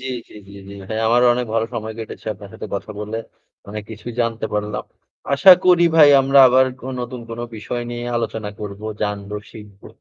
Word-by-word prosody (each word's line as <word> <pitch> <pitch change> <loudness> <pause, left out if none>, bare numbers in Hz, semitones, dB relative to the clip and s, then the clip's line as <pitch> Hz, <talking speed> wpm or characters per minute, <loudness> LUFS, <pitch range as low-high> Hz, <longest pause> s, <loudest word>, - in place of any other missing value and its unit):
জ্বী, 130 - -7 0.2
জ্বী, - - -18
জ্বী, 100 - -14 0.2
জ্বী 100 - -9
ভাই। 110 - -3
আমারও 120 +2 +4
অনেক 125 0 -2
ভালো 115 0 +1
সময় 110 0 -4
কেটেছে 115 - -8
আপনার 100 0 -12
সাথে - - -7
কথা 100 - -5
বলে, 105 +2 -4 0.5
অনেক 105 +1 -6
কিছুই 110 +2 -8
জানতে 115 -1 -1
পারলাম। 105 0 -3 0.5
আশা 185 +7 +9
করি 180 -1 +5
ভাই 150 -2 +8
আমরা 135 +1 +3
আবার 130 +1 +5 0.2
অ - - -5
নতুন 125 0 -6
কোনো 115 +1 -5
বিষয় 120 +3 -4
নিয়ে 120 0 -5
আলোচনা 110 -2 -3
করবো, 105 0 -7 0.2
জানবো, 105 0 -3
শিখবো। 105 -2 -13
110 Hz, 190 wpm, -20 LUFS, 105-125 Hz, 0.5 s, আশা